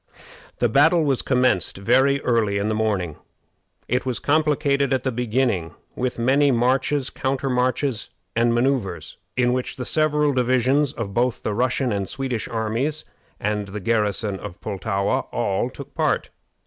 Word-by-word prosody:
The 120 - +2
battle 160 +8 +4
was 140 -4 +1
commenced 125 -10 +1
very 130 +7 +3
early 110 -5 +1
in 100 +2 0
the - - 0
morning. 100 -7 -1 0.7
It 125 +2 0
was 125 -3 -2
complicated 145 -2 +1
at 130 -1 0
the 130 - 0
beginning 115 - -1 0.2
with 125 0 -2
many 135 +5 +3
marches, 130 +2 +1
countermarches, 130 -1 -1 0.3
and 115 +1 +3
manoeuvres, 120 -3 -1 0.2
in 125 0 +3
which 125 0 -2
the 125 - -5
several 150 -1 +2
divisions 130 +3 +2
of 110 -8 -5
both 120 +2 0
the 105 - -1
Russian 125 +3 0
and 100 -2 -2
Swedish 130 -4 -3
armies, 115 +7 -2 0.3
and 105 -1 -1
the 105 +2 -6
garrison 105 -1 0
of 100 -4 -8
Pultowa, 100 0 -1
all - - 0
took - - -11
part. - - 0
125 Hz, 150 wpm, -23 LUFS, 110-135 Hz, 0.7 s, battle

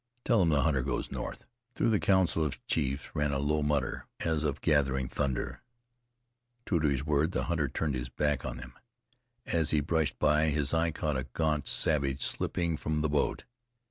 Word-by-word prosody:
Tell 115 -3 +4
them 85 -4 +4
the 75 -4 +3
hunter 70 -4 +2
goes 65 -1 -3
north." - - -5 0.3
Through - - +2
the 105 - +3
council 95 -4 +3
of 70 -3 -4
chiefs 70 +2 -1
ran 75 -1 +1
a 70 - 0
low 75 +2 +1
mutter, 75 -3 -1
as 80 -2 0
of 75 -1 -1
gathering 65 -4 +2
thunder. 65 -1 -2 1.0
True 85 - +1
to 75 - +2
his 70 -1 0
word, 75 +3 +1
the - - 0
hunter 80 -4 0
turned 75 0 -2
his 60 -1 -3
back 75 0 0
on - - -4
them. 60 0 -9 0.7
As 80 -2 +1
he 75 - +3
brushed 75 -3 0
by, 75 +1 +3
his 75 -2 0
eye 80 +1 +2
caught 75 -2 -2
a 65 +1 -4
gaunt 75 -3 0
savage 70 -3 +1
slipping 85 +3 0
from 75 0 -1
the 80 - 0
boat. 75 0 0
75 Hz, 190 wpm, -30 LUFS, 70-80 Hz, 1.0 s, Tell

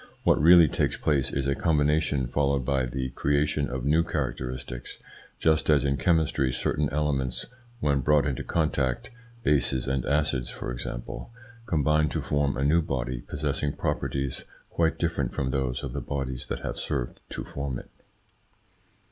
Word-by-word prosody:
What - - +4
really 85 +1 +8
takes - - 0
place 70 -3 +1
is 70 -1 -1
a 70 - +2
combination 75 -2 +2
followed 70 +1 0
by 65 -1 +1
the 65 +1 -3
creation 70 0 +1
of 60 0 -4
new 80 +3 +4
characteristics, 65 -4 -4 0.4
just 80 -1 +2
as 75 -2 +4
in 70 0 +2
chemistry 80 -5 +2
certain 75 +3 0
elements, 65 -4 -1 0.4
when 70 -2 +2
brought 75 +3 +3
into 70 -4 -2
contact 70 -6 0 0.3
bases 65 - +2
and 65 -1 0
acids, 70 -4 +1
for - - -5
example - - -6 0.4
combine 75 -2 +2
to - - -2
form 70 -3 0
a 65 - 0
new 80 +4 +4
body 65 -5 -3
possessing 70 +1 -2
properties 70 -1 -2 0.3
quite 80 -1 +1
different 80 -7 -1
from 65 -1 -1
those 65 -2 -1
of 65 - -4
the - - -3
bodies 65 -3 -4
that - - -4
have - - -4
served - - -3
to - - -5
form 70 -3 -4
it. - - -12
70 Hz, 155 wpm, -27 LUFS, 65-75 Hz, 0.4 s, really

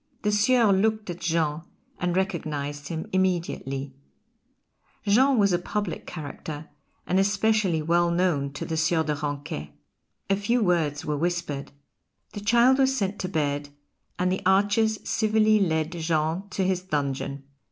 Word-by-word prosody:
The 210 - +2
Sieur 220 +1 +4
looked 210 0 +1
at 175 - -8
Jean 160 -2 0 0.4
and 180 0 0
recognised 150 -6 -2
him 160 -1 -4
immediately. 165 -7 -1 1.1
Jean 260 +6 +4
was 200 -3 +4
a 175 - +2
public 205 0 -4
character, 155 -1 -7 0.4
and 185 +2 +2
especially 195 -4 +2
well 170 +2 +2
known 170 -6 +1
to 140 - -5
the 160 - -3
Sieur 160 +1 +2
de 150 -1 -1
Ranquet. 145 - -5 0.5
A 195 - +3
few 225 +4 +1
words 160 -5 +1
were 150 -1 -1
whispered. 170 -3 -2 0.6
The 205 - -6
child 240 +5 +4
was 265 0 +3
sent 200 -2 -2
to 185 - -3
bed, 145 -3 -1 0.5
and 180 0 +1
the 190 - -1
archers 205 +3 +2
civilly 215 -1 +3
lead 160 -4 +1
Jean 165 +2 -1
to 190 0 -1
his 185 -1 0
dungeon. 140 -4 -3
175 Hz, 145 wpm, -26 LUFS, 155-205 Hz, 1.1 s, Sieur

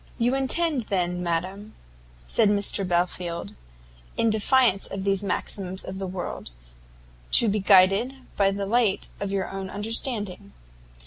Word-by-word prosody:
"You 240 +2 +1
intend, 270 -1 0
then, 180 -2 0
madam," 185 +5 -3 0.5
said 200 - +3
Mr 200 -1 0
Belfield, 175 - -2 0.6
"in 225 - +2
defiance 220 -1 +3
of 195 -1 -5
these 195 0 +1
maxims 190 -1 -3
of 190 +1 -6
the 190 - -3
world, 180 - -5 0.8
to 235 - +7
be 210 0 +1
guided 195 +6 +4 0.2
by 195 -1 +3
the 200 0 -3
light 220 -1 +1
of 200 -1 -3
your 195 -1 -1
own 195 -1 -6
understanding." 205 -2 -4
195 Hz, 135 wpm, -25 LUFS, 185-220 Hz, 0.8 s, to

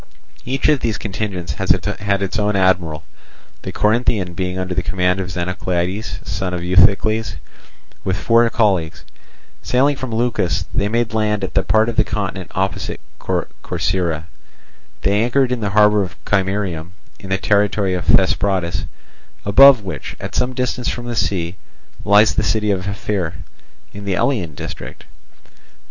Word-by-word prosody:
Each 130 +2 0
of 150 -2 +4
these 115 -3 -1
contingents 95 -6 -4
had 100 +6 0
its 100 +3 -2
own 105 0 +1
admiral, 90 -5 +1 0.6
the - - -5
Corinthian 105 -4 +1
being 90 +1 -3
under 95 0 -2
the 90 - 0
command 90 0 0
of 95 -1 -3
Xenoclides, 90 +2 -2
son 95 -2 -2
of 90 - -4
Euthycles, 100 +5 +3 0.7
with 95 -1 -1
four 115 +3 +3
colleagues. 95 -9 0 0.6
Sailing 140 +3 +2
from 130 -1 -5
Leucas, 115 -5 0
they 100 - +1
made 115 +1 0
land 105 -2 0
at 95 - -3
the 95 - +3
part 110 +3 +2
of 115 -1 -3
the - - +5
continent 100 -3 -4
opposite 95 +1 -2 0.2
Corcyra. 80 +6 -2 0.8
They 100 +4 +2
anchored 125 +2 +2
in 125 - 0
the 105 -2 -1
harbour 105 0 +4
of 95 -2 -4
Chimerium, 95 -4 -1 0.3
in 95 - -10
the 95 - +1
territory 100 -1 +1
of 90 -1 -3
Thesprotis, 95 -2 +2 0.6
above 130 +3 +7
which, 90 - -6
at - - -6
some 125 +1 0
distance 125 -1 -1
from 120 - -4
the 120 -1 -4
sea, 90 -4 -1 0.5
lies 105 +1 +5
the - - +1
city 105 0 +1
of 95 -1 -2
Ephyre, 100 -4 -2 0.6
in 100 0 -8
the 100 -2 0
Elean 90 - 0
district. - - -8
100 Hz, 150 wpm, -19 LUFS, 90-110 Hz, 0.8 s, above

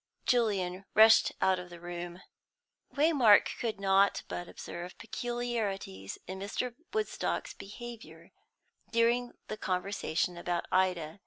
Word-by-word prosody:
Julian 195 -6 +1
rushed 220 +1 +7
out 190 -1 +3
of 180 0 -9
the 175 -1 -11
room. 175 +1 -7 0.7
Waymark 280 -8 +6
could 225 -4 -2
not 195 0 +3
but 175 - -5
observe 175 +1 -8
peculiarities 225 - -3
in 190 +1 -6
Mr. 225 +5 -3 0.2
Woodstock's 430 0 -2
behaviour 235 +3 -10 0.6
during 235 +1 +2
the 215 - -5
conversation 180 -3 -1
about 175 0 -2
Ida. 185 -2 +1
195 Hz, 110 wpm, -31 LUFS, 180-235 Hz, 0.7 s, rushed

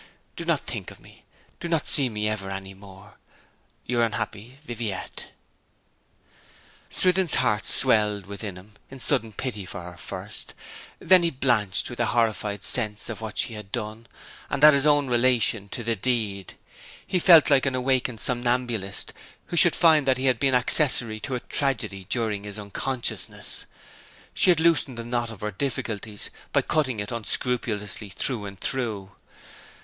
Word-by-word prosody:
Do - - -7
not - - +1
think - - -6
of - - -14
me. - - -19 0.3
Do 170 - -6
not 165 -3 -1
see 135 -3 +3
me 105 -1 -2
ever 105 -3 -4
any 95 0 -7
more. 95 +1 -16 0.7
Your 120 0 0
unhappy 115 +2 -4
'VIVIETTE.' 115 -6 -5 1.6
Swithin's 185 -3 +5
heart 105 -2 0
swelled 105 -6 +5
within 100 0 -6
him 95 +4 -14 0.2
in 135 - -11
sudden 125 -5 +2
pity 105 -1 -5
for 95 0 -8
her, 90 0 -11
first; - - -8 0.4
then 185 -1 +4
he 170 - +1
blanched 120 - 0
with 120 - -9
a 120 - +1
horrified 110 -4 -1
sense 105 -3 -2
of 115 - -6
what 110 -1 -7
she 115 - +1
had 105 -2 -10
done, 110 0 -6 0.4
and 140 +1 -2
at 150 0 +9
his 140 +1 +2
own 145 -2 +3
relation 120 -4 +1
to 120 - -6
the 115 0 -1
deed. 105 -4 -3 0.5
He 185 - -1
felt 165 -4 +7
like 135 -1 +3
an 130 - -1
awakened 125 -2 0
somnambulist 120 -4 -1 0.4
who - - -4
should 175 0 +6
find 155 -5 +4
that 130 -1 +3
he 130 - -3
had 130 -3 +2
been 135 -2 +2
accessory 125 -4 +5
to 130 +4 -4
a 125 - -4
tragedy 110 -10 -2
during 110 -4 -1
his 105 0 -6
unconsciousness. 115 +5 -4 0.7
She - - +3
had 175 -3 +4
loosened 160 -6 +2
the 115 - -6
knot 120 -1 -2
of 110 -3 -11
her 105 0 -3
difficulties 110 -3 -5 0.2
by - - +1
cutting 130 -8 -1
it 105 0 -5
unscrupulously 110 -3 -2
through 105 +2 -2
and 100 -1 -11
through. 110 -7 -3
115 Hz, 165 wpm, -24 LUFS, 105-130 Hz, 1.6 s, at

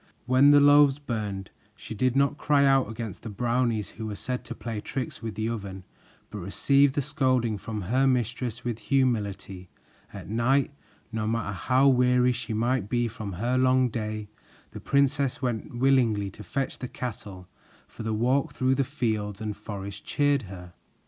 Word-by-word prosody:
When 130 +3 +5
the 145 0 +7
loaves 145 -1 +6
burned, 105 -9 -4 0.2
she - - -9
did 125 +4 0
not 140 +1 +2
cry 145 -1 +3
out 135 -4 +3
against 110 -3 -6
the 115 - -7
Brownies, 115 0 0
who 110 -1 -7
were 105 - -4
said 125 +4 -4
to - - -7
play 115 -3 -5
tricks 130 +1 -5
with 110 -1 -5
the 110 +1 -2
oven, 100 -5 -5 0.5
but 105 - -6
received 135 +9 +2
the 145 - 0
scolding 130 -5 +1
from 110 +2 -5
her 125 +9 +2
mistress 120 -1 -1
with 120 -2 -3
humility. 105 -6 -1 0.4
At - - -9
night, 125 +6 +1 0.4
no 110 -1 -2
matter 115 -2 -1
how 130 +9 +2
weary 125 -1 +4
she 120 -2 -5
might 115 -1 0
be 120 0 +1
from 105 -3 -6
her 120 +8 0
long 130 0 +3
day, 110 -1 -4 0.4
the - - -8
princess 140 -1 +1
went 120 -2 -3
willingly 120 -6 +2
to 105 - -11
fetch 135 +3 -3
the 125 - -4
cattle, 100 -7 -7 0.4
for - - -11
the 110 0 -2
walk 125 +6 +1
through 130 0 +1
the 135 +1 +1
fields 105 -5 -2
and 105 -2 -4
forest 100 -1 -7
cheered 145 -1 +1
her. 90 -2 -10
120 Hz, 175 wpm, -27 LUFS, 105-130 Hz, 0.5 s, the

